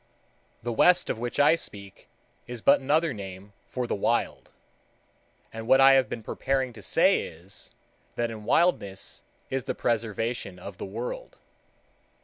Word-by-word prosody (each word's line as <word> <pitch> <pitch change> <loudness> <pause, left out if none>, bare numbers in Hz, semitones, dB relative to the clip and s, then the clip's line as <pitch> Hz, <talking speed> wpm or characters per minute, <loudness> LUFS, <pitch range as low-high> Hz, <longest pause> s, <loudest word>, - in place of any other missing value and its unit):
The 120 - -2
West 180 +9 +4
of - - -5
which 120 0 -3
I 145 +2 +6
speak 100 - -6 0.4
is 120 -2 -7
but 140 - +6
another 155 +3 +2
name 100 -1 -9
for 125 -1 -3
the - - -2
Wild; 100 - -1 1.0
and 115 0 -7
what 130 - +6
I 135 0 +8
have 135 -4 +4
been 115 - -5
preparing 130 +2 -1
to 110 - -12
say - - +3
is, 85 +5 -10 0.5
that 120 -1 -1
in 110 -1 -8
Wildness 105 - +1 0.3
is 135 -1 -2
the - - -2
preservation 115 -3 -2
of 90 - -10
the - - -4
World. 115 +6 -6
115 Hz, 150 wpm, -27 LUFS, 100-135 Hz, 1.0 s, I